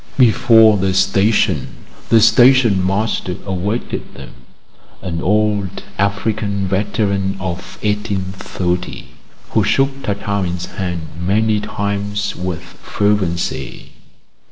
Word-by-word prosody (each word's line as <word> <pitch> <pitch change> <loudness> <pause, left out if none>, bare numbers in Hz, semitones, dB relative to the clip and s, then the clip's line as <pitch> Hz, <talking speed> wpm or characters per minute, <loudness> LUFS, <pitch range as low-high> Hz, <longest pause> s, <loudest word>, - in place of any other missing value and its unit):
Before 115 -3 +5
the 95 -1 0
station 100 +3 +2 0.4
the 115 -1 +5
station 115 -3 +5
master 95 -1 -1
awaited 100 +4 -3
them, - - -10 0.7
an 85 -2 -3
old 105 -1 0 0.2
African 100 0 -1
veteran 100 0 0
of 90 -1 -6
1830, 95 -4 -3 0.4
who - - +2
shook 135 0 +1
Tartarin's 100 -4 -2
hand 90 -3 -4 0.2
many 105 +4 +1
times 100 0 -3
with 90 -1 -4
fervency. 95 -1 -2
100 Hz, 90 wpm, -18 LUFS, 95-110 Hz, 0.7 s, Before